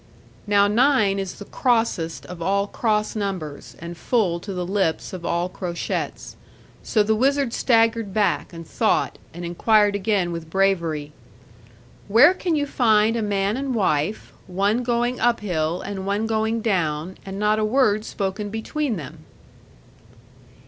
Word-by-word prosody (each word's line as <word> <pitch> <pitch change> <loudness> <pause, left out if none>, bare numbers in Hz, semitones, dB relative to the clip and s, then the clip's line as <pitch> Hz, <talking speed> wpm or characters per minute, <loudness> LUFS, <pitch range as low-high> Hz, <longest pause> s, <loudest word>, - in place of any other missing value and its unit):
Now 205 0 +4
nine 215 -3 +3
is 190 -2 -4
the 205 - -10
crossest 225 -11 0
of 180 -1 -9
all 200 +3 +1
cross 215 0 -1
numbers, 185 -8 -4
and 170 +1 -8
full 180 -1 0
to 200 - -7
the 180 -2 -3
lip 190 -4 0
of 180 -2 -6
all 170 +1 0
crochets. 180 -2 -4 0.5
So 215 -3 +2
the 220 +1 +2
wizard 270 +2 +1
staggered 225 -3 +2
back, 205 +1 0
and 165 -2 -10
thought, - - 0
and 175 +1 -7
inquired 205 +4 +3
again 200 -3 0
with 165 -1 -6
bravery, 170 -6 0 1.0
'Where 240 - +7
can 360 -3 -1
you 290 -1 +1
find 225 -5 +3
a 230 - -1
man 200 0 0
and 270 -1 -2
wife, 185 -1 0
one 200 +6 +1
going 240 +1 0
up 240 -2 +2
hill 170 -3 -1
and 195 -1 -5
one 205 +2 0
going 220 +1 0
down, 175 -4 -1
and 195 0 -7
not 210 +1 +2
a - - +1
word 215 -2 +2
spoken 205 0 -3
between 230 +5 -2
them?' 160 -7 -8
205 Hz, 150 wpm, -23 LUFS, 180-225 Hz, 1.0 s, Where